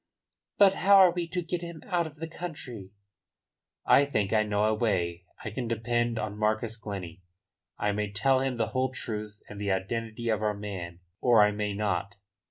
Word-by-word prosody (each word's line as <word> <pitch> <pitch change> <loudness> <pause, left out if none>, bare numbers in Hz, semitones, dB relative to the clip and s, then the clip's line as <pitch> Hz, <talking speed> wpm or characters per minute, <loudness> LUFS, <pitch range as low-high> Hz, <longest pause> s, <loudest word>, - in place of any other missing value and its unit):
"But 195 -2 +7
how 200 +1 +5
are 190 -2 +8
we 175 -1 -3
to 180 +1 -3
get 170 +1 -3
him 170 -2 -8
out 175 -4 0
of 150 - -12
the 165 +1 -6
country?" 145 - -7 1.0
"I 140 - +6
think 110 -8 0
I 110 - +4
know 105 -1 0
a 110 0 +3
way. 90 -6 -1 0.2
I 110 - -3
can 120 +3 -3
depend 120 +1 0
on 105 -1 -4
Marcus 110 +1 0
Glennie. 100 -5 -7 0.6
I 105 - 0
may 105 0 -2
tell 130 +6 +3
him 130 -2 -1
the 115 - 0
whole 130 0 0
truth 105 -4 -5
and 105 -1 -8
the 100 -1 0
identity 115 +4 -2
of 110 -2 +1
our 105 -1 0
man, 90 -4 -6 0.2
or 115 -4 +6
I 105 - +4
may 105 -1 -2
not. 100 -1 -1
110 Hz, 190 wpm, -28 LUFS, 105-130 Hz, 1.0 s, are